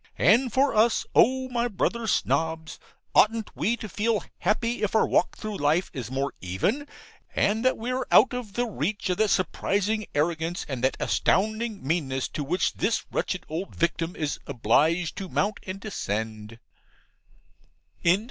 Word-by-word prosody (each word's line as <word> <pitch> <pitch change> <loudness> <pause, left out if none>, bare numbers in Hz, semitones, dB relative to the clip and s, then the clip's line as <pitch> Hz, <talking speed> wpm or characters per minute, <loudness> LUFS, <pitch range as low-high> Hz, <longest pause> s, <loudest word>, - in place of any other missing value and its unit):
And 235 +7 +4
for 270 +4 +2
us, 220 +2 +3
O 260 +1 +4
my 240 -1 0
brother 235 +1 -1
Snobs, 160 -4 0 0.3
oughtn't 225 0 +3
we 235 +3 0
to 215 - -6
feel 215 +2 0 0.2
happy 230 +5 0
if 210 +1 -1
our 220 - +5
walk - - +1
through 215 -2 -5
life 150 +5 +1
is 120 -4 -5
more 135 +2 -2
even, 145 - -1 0.5
and 220 +3 +2
that 255 - +3
we 235 +3 -3
are 255 0 -2
out 260 - +6
of 245 -5 -5
the 245 - 0
reach 200 - -2
of 180 - -1
that 215 -1 +2
surprising 205 +3 0
arrogance 165 +3 -1
and 130 -3 -4
that 130 - +2
astounding 215 - 0
meanness 135 -4 -1
to 150 - -4
which 175 +7 0
this 225 +3 0
wretched 185 - -2
old 170 +5 -5
victim 170 0 -1
is 150 -2 -2
obliged 155 +7 +2
to 195 -2 -5
mount 205 +4 0
and 185 +1 -5
descend. 110 - -4
195 Hz, 155 wpm, -26 LUFS, 155-225 Hz, 0.5 s, out